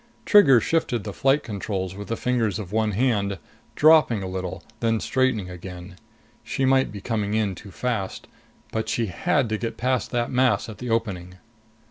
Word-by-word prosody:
Trigger 145 Hz, -, +7 dB
shifted 125 Hz, -7 st, 0 dB
the 105 Hz, -, -6 dB
flight 135 Hz, +6 st, +2 dB
controls 95 Hz, -3 st, -4 dB
with 100 Hz, +1 st, -8 dB
the 115 Hz, -, -2 dB
fingers 120 Hz, -5 st, 0 dB
of 100 Hz, -4 st, -7 dB
one 110 Hz, -1 st, +1 dB
hand, 100 Hz, -4 st, +1 dB, 0.4 s
dropping 150 Hz, -9 st, +5 dB
a -, -, -4 dB
little, 95 Hz, -1 st, -5 dB, 0.2 s
then 115 Hz, -1 st, +1 dB
straightening 130 Hz, -7 st, 0 dB
again. 90 Hz, 0 st, -9 dB, 0.5 s
She 135 Hz, -, -1 dB
might 130 Hz, 0 st, +3 dB
be 100 Hz, -1 st, -8 dB
coming 105 Hz, -2 st, -1 dB
in 105 Hz, -3 st, +1 dB
too 100 Hz, +3 st, -11 dB
fast. 105 Hz, -1 st, -3 dB, 0.5 s
But 110 Hz, 0 st, -2 dB
she 115 Hz, -, 0 dB
had 115 Hz, -, 0 dB
to 110 Hz, -1 st, -1 dB
get 115 Hz, -, -4 dB
past 130 Hz, 0 st, 0 dB
that 120 Hz, -1 st, -1 dB
mass 130 Hz, -1 st, +2 dB
at 110 Hz, -, -9 dB
the 125 Hz, -, -5 dB
opening. 95 Hz, -6 st, -2 dB
110 Hz, 175 wpm, -24 LUFS, 100-125 Hz, 0.5 s, Trigger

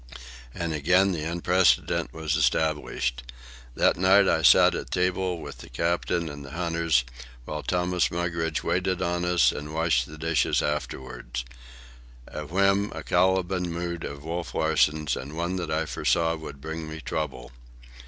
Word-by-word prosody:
And 85 Hz, +4 st, -3 dB
again 90 Hz, +6 st, +3 dB
the 80 Hz, -4 st, -3 dB
unprecedented 90 Hz, +2 st, +2 dB
was 80 Hz, -2 st, -2 dB
established. 75 Hz, -6 st, 0 dB, 0.5 s
That -, -, +3 dB
night 95 Hz, +2 st, +5 dB
I 80 Hz, -, +2 dB
sat -, -, +7 dB
at -, -, -5 dB
table 90 Hz, -1 st, 0 dB
with -, -, -9 dB
the -, -, -11 dB
captain 85 Hz, +4 st, -1 dB
and 70 Hz, -2 st, -7 dB
the 70 Hz, -, -10 dB
hunters, 85 Hz, -5 st, +1 dB, 0.4 s
while 75 Hz, +2 st, -4 dB
Thomas 90 Hz, 0 st, 0 dB
Mugridge 85 Hz, -2 st, -2 dB
waited 90 Hz, +1 st, 0 dB
on 85 Hz, 0 st, -1 dB
us 90 Hz, -1 st, +4 dB
and 75 Hz, +2 st, -7 dB
washed 80 Hz, -7 st, +2 dB
the 75 Hz, -, -11 dB
dishes 80 Hz, 0 st, +1 dB
afterward—a 60 Hz, -1 st, -7 dB
whim, 100 Hz, +4 st, +2 dB
a -, -, -6 dB
Caliban 90 Hz, 0 st, +1 dB
mood 85 Hz, 0 st, -4 dB
of 70 Hz, 0 st, -7 dB
Wolf 85 Hz, +1 st, -4 dB
Larsen's, 75 Hz, -2 st, +2 dB
and 70 Hz, +5 st, -7 dB
one 85 Hz, 0 st, -2 dB
I 80 Hz, +1 st, 0 dB
foresaw 80 Hz, +1 st, +1 dB
would 80 Hz, -4 st, -9 dB
bring 80 Hz, +2 st, -6 dB
me 80 Hz, +1 st, -7 dB
trouble. 65 Hz, -6 st, -4 dB
80 Hz, 145 wpm, -26 LUFS, 75-90 Hz, 0.5 s, sat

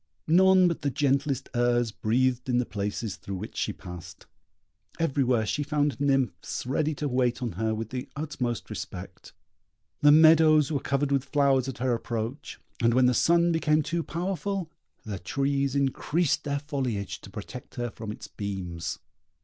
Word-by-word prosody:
None 185 Hz, +2 st, +6 dB
but 170 Hz, -, -2 dB
the 145 Hz, -, 0 dB
gentlest 140 Hz, 0 st, 0 dB
airs 120 Hz, -1 st, +2 dB
breathed 125 Hz, +4 st, 0 dB
in 125 Hz, -, +2 dB
the 125 Hz, -, +1 dB
places 105 Hz, 0 st, -3 dB
through 100 Hz, -, -6 dB
which 90 Hz, -, -7 dB
she -, -, -1 dB
passed. 90 Hz, -1 st, -10 dB, 0.7 s
Everywhere 130 Hz, -7 st, +1 dB
she 145 Hz, -, -1 dB
found 145 Hz, -1 st, 0 dB
nymphs 135 Hz, -13 st, 0 dB
ready 150 Hz, +4 st, 0 dB
to 150 Hz, -, -2 dB
wait 125 Hz, -1 st, 0 dB
on 120 Hz, -, -2 dB
her 110 Hz, +4 st, -1 dB
with 110 Hz, 0 st, -5 dB
the 130 Hz, -1 st, -5 dB
utmost 140 Hz, -6 st, -3 dB
respect; -, -, -8 dB, 0.7 s
the 145 Hz, -, +6 dB
meadows 155 Hz, -1 st, +6 dB
were 145 Hz, -, 0 dB
covered 140 Hz, +1 st, -1 dB
with 140 Hz, -1 st, +1 dB
flowers 140 Hz, -2 st, +2 dB
at 135 Hz, -, -5 dB
her 125 Hz, 0 st, 0 dB
approach; 115 Hz, +3 st, -4 dB, 0.2 s
and 115 Hz, 0 st, +3 dB
when 130 Hz, 0 st, +5 dB
the 125 Hz, -, +4 dB
sun 170 Hz, +6 st, +3 dB
became 155 Hz, -2 st, +2 dB
too 165 Hz, +3 st, -1 dB
powerful, 185 Hz, +1 st, -3 dB, 0.3 s
the 100 Hz, -3 st, -5 dB
trees 140 Hz, +6 st, -1 dB
increased 140 Hz, +4 st, 0 dB
their 140 Hz, -1 st, 0 dB
foliage 130 Hz, -, -3 dB
to -, -, -11 dB
protect 105 Hz, +5 st, -9 dB
her 120 Hz, -1 st, -3 dB
from 110 Hz, -1 st, -7 dB
its -, -, -9 dB
beams. 90 Hz, -5 st, -5 dB
130 Hz, 165 wpm, -27 LUFS, 115-150 Hz, 0.7 s, None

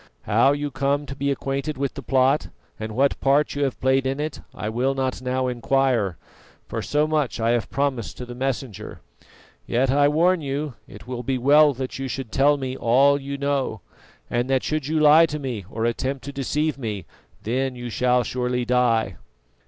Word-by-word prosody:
How 115 Hz, +6 st, +4 dB
you 145 Hz, 0 st, -2 dB
come 140 Hz, +3 st, 0 dB
to 135 Hz, -, -7 dB
be 140 Hz, +1 st, -1 dB
acquainted 140 Hz, +1 st, -2 dB
with 140 Hz, 0 st, -2 dB
the 140 Hz, -, -7 dB
plot, 135 Hz, +2 st, +2 dB, 0.3 s
and 110 Hz, 0 st, -5 dB
what 140 Hz, +2 st, +2 dB
part 140 Hz, +2 st, +2 dB
you 145 Hz, -, -1 dB
have 135 Hz, -, -3 dB
played 130 Hz, 0 st, +2 dB
in 135 Hz, +2 st, -2 dB
it, 150 Hz, -1 st, -4 dB
I 105 Hz, -, -6 dB
will 125 Hz, +5 st, 0 dB
not 130 Hz, -1 st, -2 dB
now 130 Hz, 0 st, -1 dB
inquire, 125 Hz, -5 st, +1 dB, 0.5 s
for -, -, -3 dB
so 150 Hz, +1 st, +1 dB
much 155 Hz, -4 st, 0 dB
have 115 Hz, 0 st, +1 dB
I -, -, -15 dB
promised 135 Hz, -5 st, -1 dB
to 125 Hz, -, -6 dB
the 120 Hz, -, -8 dB
Messenger. 130 Hz, -3 st, -4 dB, 0.7 s
Yet 130 Hz, +2 st, +1 dB
I 145 Hz, +1 st, +4 dB
warn 170 Hz, +4 st, +3 dB
you 140 Hz, 0 st, -3 dB
it 100 Hz, +2 st, -12 dB
will 125 Hz, -1 st, -5 dB
be 130 Hz, +2 st, -1 dB
well 145 Hz, +3 st, +5 dB
that 130 Hz, +1 st, -5 dB
you 135 Hz, -, -3 dB
should 130 Hz, -2 st, -5 dB
tell 145 Hz, +2 st, +4 dB
me 130 Hz, -2 st, -4 dB
all 140 Hz, +4 st, +3 dB
you 140 Hz, +1 st, -5 dB
know, 140 Hz, -6 st, -1 dB, 0.5 s
and 120 Hz, +2 st, -1 dB
that 135 Hz, -1 st, +2 dB
should 155 Hz, -3 st, -2 dB
you 155 Hz, +1 st, +1 dB
lie 155 Hz, +2 st, +7 dB
to 150 Hz, -, -4 dB
me 125 Hz, -9 st, -5 dB
or 115 Hz, -1 st, -2 dB
attempt 130 Hz, +3 st, -2 dB
to 140 Hz, -, -6 dB
deceive 150 Hz, +2 st, -1 dB
me, 105 Hz, -7 st, -4 dB, 0.4 s
then 130 Hz, +4 st, -1 dB
you 120 Hz, -1 st, -6 dB
shall 125 Hz, +3 st, +2 dB
surely 125 Hz, +1 st, -2 dB
die." 115 Hz, -7 st, +1 dB
135 Hz, 195 wpm, -23 LUFS, 125-140 Hz, 0.7 s, lie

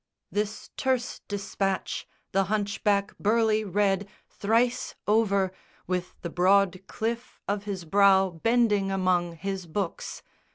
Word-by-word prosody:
This 210 Hz, +1 st, -3 dB
terse 255 Hz, -2 st, 0 dB
despatch 195 Hz, -1 st, -2 dB, 0.2 s
the 195 Hz, 0 st, +2 dB
hunchback 205 Hz, 0 st, 0 dB
Burleigh 220 Hz, 0 st, +3 dB
read 200 Hz, 0 st, +1 dB, 0.2 s
Thrice 230 Hz, +4 st, 0 dB
over, 200 Hz, -3 st, +2 dB, 0.3 s
with 180 Hz, 0 st, -3 dB
the 170 Hz, -, -3 dB
broad 185 Hz, +1 st, +3 dB
cliff 235 Hz, +2 st, -4 dB
of 205 Hz, 0 st, -1 dB
his 190 Hz, -4 st, -4 dB
brow 195 Hz, +1 st, +5 dB
Bending 210 Hz, +2 st, +2 dB
among 180 Hz, -3 st, +1 dB
his 190 Hz, +1 st, -4 dB
books. 180 Hz, +2 st, -4 dB
200 Hz, 115 wpm, -27 LUFS, 190-215 Hz, 0.3 s, brow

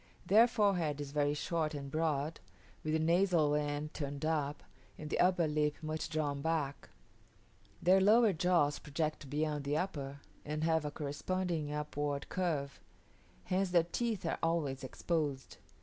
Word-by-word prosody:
Their 220 Hz, +5 st, +6 dB
forehead 190 Hz, -10 st, +1 dB
is 145 Hz, -1 st, -5 dB
very 145 Hz, 0 st, +1 dB
short 155 Hz, 0 st, -1 dB
and 140 Hz, -1 st, -6 dB
broad, 155 Hz, -1 st, -1 dB, 0.4 s
with 155 Hz, -, -1 dB
the -, -, +4 dB
nasal 170 Hz, -2 st, +3 dB
end 150 Hz, 0 st, -1 dB
turned 145 Hz, 0 st, -4 dB
up, 150 Hz, -2 st, -1 dB, 0.3 s
and 150 Hz, -1 st, -7 dB
the -, -, 0 dB
upper 180 Hz, -2 st, +4 dB
lip 150 Hz, -1 st, +1 dB
much 155 Hz, 0 st, -3 dB
drawn 145 Hz, -3 st, -1 dB
back; 150 Hz, -3 st, -2 dB, 0.9 s
their 185 Hz, +2 st, +6 dB
lower 215 Hz, +1 st, +5 dB
jaws 170 Hz, -4 st, +2 dB
project 150 Hz, -1 st, -3 dB
beyond 150 Hz, 0 st, -1 dB
the 145 Hz, +2 st, 0 dB
upper, 140 Hz, -6 st, -3 dB, 0.2 s
and 150 Hz, +1 st, -3 dB
have 160 Hz, -1 st, +2 dB
a -, -, -1 dB
corresponding 155 Hz, +2 st, -2 dB
upward 145 Hz, -1 st, -3 dB
curve; 155 Hz, -7 st, -2 dB, 0.6 s
hence 185 Hz, +1 st, 0 dB
their 175 Hz, -2 st, +4 dB
teeth 215 Hz, +3 st, -2 dB
are 165 Hz, -, -1 dB
always 160 Hz, -6 st, 0 dB
exposed. 145 Hz, -1 st, -2 dB
155 Hz, 150 wpm, -34 LUFS, 145-170 Hz, 0.9 s, Their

